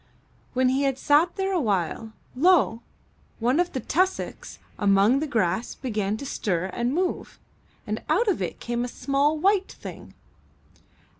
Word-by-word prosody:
When 255 0 +3
he 265 +2 +1
had 270 -2 +1
sat 300 +6 +3
there 385 0 -1
a 365 - +2
while, 210 - -1 0.2
lo! 290 -6 +3 0.6
one 245 +7 +1
of 355 0 +1
the 260 - -2
tus 370 +8 +2
socks - - -8 0.2
among 205 +5 +4
the 310 - -2
grass 220 -3 0
began 215 -5 -2
to 280 - -7
stir 185 -7 -2
and 240 +1 -1
move, 360 +5 -2 0.5
and 215 +1 -3
out 395 +10 +2
of 375 - +1
it 180 - -4
came 240 0 -2
a - - -2
small 280 +4 0
white 390 +4 +2
thing. - - -10
260 Hz, 160 wpm, -25 LUFS, 220-315 Hz, 0.6 s, among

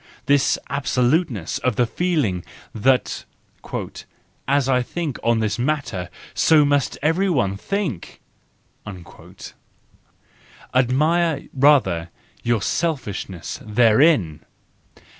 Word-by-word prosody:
This 140 -1 +3
absoluteness 130 - 0
of 125 -3 0
the 125 - +2
feeling 120 - -1 0.3
that 125 +4 +1 0.6
" - - -14
as 140 0 +2
I 130 -1 +2
think 150 +1 -4
on 115 -1 +2
this 110 +1 -1
matter, 120 -10 -2 0.2
so 155 -2 +4
must 145 -2 +1
everyone 155 - +1
think"? 165 - -4 2.5
Admire 150 +5 +2
rather 125 - +3 0.3
your 115 -3 0
selfishness 115 - -3
therein! 110 - +3
130 Hz, 85 wpm, -21 LUFS, 110-150 Hz, 2.5 s, so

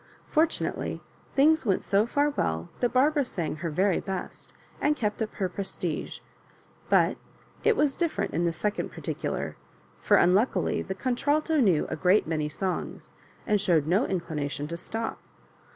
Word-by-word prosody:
Fortunately, 320 +1 0 0.4
things 310 +3 +5
went 200 -6 +1
so 205 +3 +2
far 290 +4 +2
well 80 - -2
that 245 - +1
Barbara 285 +3 +3
sang 170 -11 -3
her 170 +1 -3
very 185 +4 +2
best, 190 -2 -6 0.3
and 300 +1 +3
kept 210 -4 -2
up 215 - -1
her 190 - 0
prestige 185 -3 -4 0.7
:h\3X - - +4 0.5
it 455 -1 +3
was 290 -2 +2
different 340 -2 -1
in 170 - +1
the 170 - +2
second 205 +6 -2
particular; - - -4 0.4
for, - - +4
unluckily, 195 +8 +3
the 190 - -5
contralto 290 - +1
knew 185 - +3
a - - 0
great 185 +3 +3
many 155 -2 -1
songs, 185 +4 -4 0.3
and 210 -2 +2
showed 170 -7 +3
no 185 - +2
inclination 150 -5 -3
to 170 - -3
stop. 225 +6 -4
200 Hz, 150 wpm, -27 LUFS, 170-270 Hz, 0.7 s, things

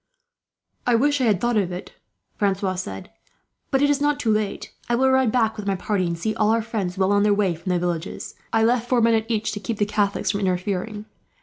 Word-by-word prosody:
"I 245 - +4
wish 285 +3 +2
I - - +3
had 210 -5 +3
thought 240 +1 +1
of 190 -3 +1
it," 180 +1 -7 0.4
Francois 195 -2 0
said. 100 - -6 0.6
"But 270 +1 +2
it 285 - +4
is 285 0 0
not 290 0 +1
too 225 -6 +1
late. 215 -2 -2 0.2
I 240 - +3
will 265 +2 +3
ride 260 -3 +3
back 225 -2 +1
with 205 -1 -6
my 195 - +1
party, 185 -1 -1
and 170 0 -2
see 215 +6 -1
all 215 -1 +1
our 225 0 +2
friends 200 -5 -3
well 190 +1 +2
on 205 0 +3
their 205 0 +3
way 200 -4 +1
from 170 +3 -7
the 180 - +2
villages. 175 -1 -3 0.2
I 225 0 +3
left 240 +1 +1
four 250 - +3
men 230 0 +4
at 220 0 0
each, 220 -1 0
to 205 - -5
keep 210 +2 -4
the 205 - +2
Catholics 205 -1 0
from 200 - -2
interfering. 195 +3 -2
210 Hz, 240 wpm, -23 LUFS, 190-230 Hz, 0.6 s, I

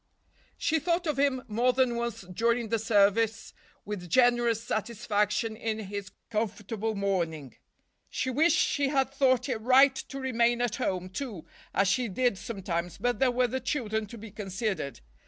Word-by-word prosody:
She 320 0 +1
thought 340 +3 0
of 300 -4 -1
him 275 -2 +2
more 240 +3 +2
than 255 -2 +2
once 235 -1 -3
during 230 +5 0
the 230 0 +1
service 220 +1 +2 0.3
with 200 -4 -6
generous 240 +1 +3
satisfaction 215 -1 -1
in 220 -1 -2
his 200 -2 -6 0.2
comfortable 215 0 -2
morning. 170 - -2 0.5
She 260 - -2
wished 315 +7 +3
she 285 -1 +2
had 270 -1 +1
thought 260 -3 +2
it 240 -5 -2
right 265 +3 +6
to 275 - -6
remain 240 -2 +2
at 245 -3 0
home, 185 -1 -2
too, 195 - -6 0.3
as 195 +1 +2
she 240 +6 +1
did 220 0 0
sometimes, 180 -5 -4
but 245 0 -1
there 265 -1 +4
were 250 +1 +2
the 255 +2 -2
children 220 -5 -2
to 235 - -10
be 220 -1 -10
considered. 195 - -3
230 Hz, 160 wpm, -28 LUFS, 205-255 Hz, 0.5 s, right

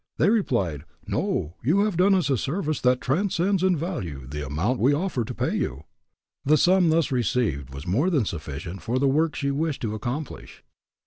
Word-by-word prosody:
They 200 - +4
replied, 100 - 0 0.2
"No; 80 +4 -2
you 165 - +3
have 210 -3 0
done 190 +3 +4
us 180 -6 +1
a - - +4
service 155 - -2
that 125 0 +3
transcends 185 +5 +1
in 185 -2 +3
value 90 - -4
the 75 +3 -5
amount 85 - -1
we 135 +5 +4
offer 155 -6 -1
to - - -6
pay - - -1
you." 65 +4 -3 0.6
The 150 +2 +4
sum 180 +1 +4
thus 160 -2 +2
received 110 - 0
was 70 +2 -8
more 130 - +1
than 145 - +2
sufficient 85 +1 -6
for 120 +3 -1
the 140 +1 +2
work 155 +4 +2
she 140 -1 -1
wished 150 0 -2
to 110 -2 -1
accomplish. 125 +7 -6
135 Hz, 190 wpm, -25 LUFS, -, 0.6 s, They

